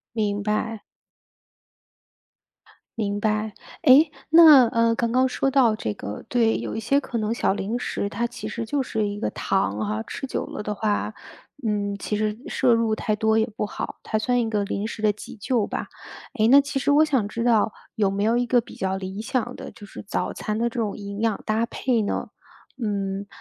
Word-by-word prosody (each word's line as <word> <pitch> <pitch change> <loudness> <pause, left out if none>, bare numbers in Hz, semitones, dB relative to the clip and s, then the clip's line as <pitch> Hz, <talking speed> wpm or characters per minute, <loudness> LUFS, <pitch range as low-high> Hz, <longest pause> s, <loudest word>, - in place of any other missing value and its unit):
明 205 -2 0
白。 215 +1 -2 2.2
明 205 -2 -1
白。 215 0 0 0.3
诶， 295 +1 +7 0.2
那， 310 -6 +9
呃， 230 0 +2
刚 230 0 -1
刚 255 +1 +4
说 270 +1 0
到 255 -5 +4
这 105 - -3
个 105 0 -7
对， 230 -2 +2
有 - - -4
一 225 - -3
些 275 +5 +2
可 240 -4 -4
能 215 +1 -1
小 235 - +1
零 210 +4 -2
食， 205 - -2
它 230 +4 -2
其 230 -2 -7
实 230 +1 -4
就 275 +5 -1
是 220 -4 -1
一 205 0 -5
个 - - -1
糖 190 - -1
哈， 105 +1 -2
吃 - - -5
久 - - -3
了 - - -6
的 210 0 -3
话， 210 +1 -1 0.5
嗯， 205 -1 -1
其 210 - -2
实 215 0 -1
摄 250 -3 +3
入 230 -1 +1
太 215 0 -1
多 220 +1 +2
也 220 - +2
不 - - -1
好， 210 - -6
它 215 - -1
算 245 +3 +1
一 225 -2 -1
个 210 -2 0
临 200 +1 -3
时 225 -1 -7
的 210 -1 +4
急 210 - -10
救 225 0 0
吧。 - - -4 0.5
诶， 220 0 +3
那 275 +3 +8
其 275 -1 -2
实 275 - 0
我 295 +2 +6
想 265 -9 +1
知 230 +2 -3
道， 225 -3 +3 0.2
有 205 -3 +2
没 200 +1 -1
有 230 +2 +3
一 245 - +2
个 245 +1 +4
比 230 - -13
较 190 0 -2
理 190 +2 -5
想 245 +1 -2
的 - - -8
就 205 - -13
是 - - -9
早 200 - -2
餐 215 0 -3
的 235 +1 +1
这 235 0 -4
种 210 -3 -2
营 200 0 -6
养 225 -2 0
搭 220 +1 +1
配 240 -1 0
呢？ 205 - -2 0.5
嗯， 200 -2 -2
220 Hz, 225 characters per minute, -24 LUFS, 205-240 Hz, 2.2 s, 那